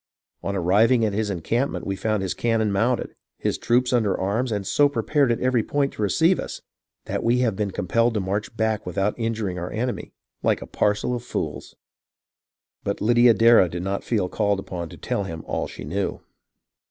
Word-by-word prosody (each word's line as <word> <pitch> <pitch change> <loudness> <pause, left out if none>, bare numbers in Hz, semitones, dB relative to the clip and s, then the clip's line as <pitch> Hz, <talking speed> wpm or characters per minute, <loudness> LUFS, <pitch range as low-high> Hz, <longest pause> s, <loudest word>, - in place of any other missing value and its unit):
On 100 - -3
arriving 110 +7 +3
at 105 - -1
his 105 +1 -1
encampment 115 - -1
we 95 - -2
found 105 0 -1
his 95 - -1
cannon 115 -3 +1
mounted, 115 +5 0 0.2
his - - -2
troops 125 +2 +2
under 110 -5 +2
arms 110 +6 0
and 100 -2 -2
so 145 +8 +3
prepared 140 +1 +1
at 115 - 0
every 125 -2 +2
point 140 +4 -1
to - - -7
receive 160 - +3
us - - -5 0.5
that - - -3
we 120 +2 +3
have 115 -5 +1
been 105 0 -1
compelled 115 +6 +1
to - - +2
march 100 +3 -3
back 110 -1 0
without 95 +3 -1
injuring 110 -5 -2
our 85 - -4
enemy, 120 +3 -3 0.3
like - - +2
a - - -7
parcel 105 +4 0
of 120 - -4
fools." - - -5 1.1
But - - -2
Lydia 120 +1 +5
Darrah 115 -5 +6
did 85 +1 -5
not 95 +1 -2
feel 105 -6 0
called 100 +1 0
upon 85 -3 -6
to - - -11
tell 100 - -2
him 80 -3 -6
all - - -2
she - - -9
knew. 100 +1 -2
110 Hz, 190 wpm, -24 LUFS, 100-120 Hz, 1.1 s, Darrah